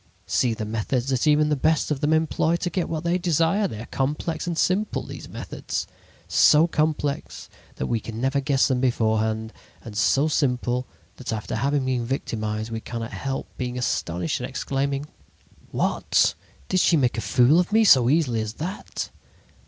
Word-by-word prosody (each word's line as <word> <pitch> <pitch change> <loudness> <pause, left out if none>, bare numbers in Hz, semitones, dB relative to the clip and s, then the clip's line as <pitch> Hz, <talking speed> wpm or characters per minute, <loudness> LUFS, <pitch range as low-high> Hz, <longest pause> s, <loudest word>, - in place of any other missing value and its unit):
"See 115 +6 +1
the 110 -1 -4
methods 115 +4 -1
that 130 +2 +1
even 150 0 +4
the 150 - +2
best 155 +2 +1
of 140 - -1
them 150 - +2
employ 160 +1 +2
to 175 +1 -2
get 180 0 -1
what 160 -2 -3
they 170 +2 +1
desire. 175 +4 +2
They 110 - -7
are - - -7
complex 150 +6 -2
and 170 -2 -2
simple, 200 +6 +1
these - - -9
methods. - - -4 0.4
So 150 +2 +6
complex 150 - -2 0.3
that - - -3
we 115 - 0
can 110 +1 -7
never 135 +3 +1
guess 135 -1 +2
at - - 0
them 130 -2 +1
beforehand, 110 -2 0 0.3
and 110 -3 -9
so 135 +7 +3
simple 125 -4 0 0.3
that 130 - -5
after 110 -1 -3
having 140 +3 0
been 130 -2 0
victimized 110 -4 -3
we 115 0 -4
cannot 115 0 -6
help 135 -1 -3
being 125 -1 -3
astonished 90 -8 -1
and - - -4
exclaiming: 140 +1 -2 0.6
'What! - - +2 0.3
Did 185 - +1
she 170 - +4
make 125 -4 +1
a - - -1
fool 130 +10 +4
of 180 +2 0
me 220 +1 +5
so 130 - +6
easily 135 -7 +2
as 110 0 -4
that?' 180 - -5
135 Hz, 180 wpm, -24 LUFS, 115-155 Hz, 0.6 s, So